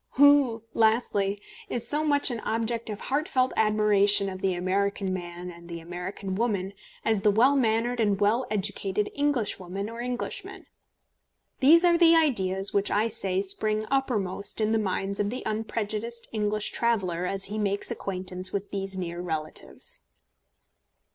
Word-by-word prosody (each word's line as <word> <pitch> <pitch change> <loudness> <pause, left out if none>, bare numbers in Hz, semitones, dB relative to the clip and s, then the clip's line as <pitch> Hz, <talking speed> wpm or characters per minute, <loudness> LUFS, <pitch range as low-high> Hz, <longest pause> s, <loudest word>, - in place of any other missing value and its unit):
Who, 280 -5 +5
lastly, 220 -3 +1 0.3
is 235 -1 -1
so 300 +4 +2
much 285 -3 +2
an 235 - -3
object 230 +1 -2
of 210 -1 -5
heart 295 +6 -1
felt 255 -5 +1
admiration 210 -2 +4
of 185 0 -7
the 190 -2 +1
American 195 +1 -1
man 175 0 -6
and 170 0 -14
the 170 0 -6
American 180 +3 -6
woman 200 -3 -1 0.3
as 220 -3 +2
the 210 - +4
well 240 +7 +4
mannered 240 -1 +1
and 205 -3 +2
well 225 +5 +2
educated 205 0 -1
Englishwoman 215 -8 -1
or 230 +1 -6
Englishman? 245 0 -5 0.9
These 330 +6 +6
are 340 -1 +4
the 335 -1 +7
ideas 195 - +1
which 200 0 +2
I 215 +3 +1
say 195 -3 0
spring 215 +2 -1
uppermost 205 -8 -1
in 215 0 +1
the 225 - +2
minds 195 -1 -2
of 205 0 +1
the 250 +3 -5
unprejudiced 220 +1 -3
English 210 -1 -1
traveller 185 -7 0
as 195 0 -3
he 210 +2 -3
makes 200 -1 -1
acquaintance 185 -1 -1
with 200 0 -4
these 195 -1 -2
near 175 -1 -4
relatives. 155 -3 -5
210 Hz, 155 wpm, -27 LUFS, 195-235 Hz, 0.9 s, the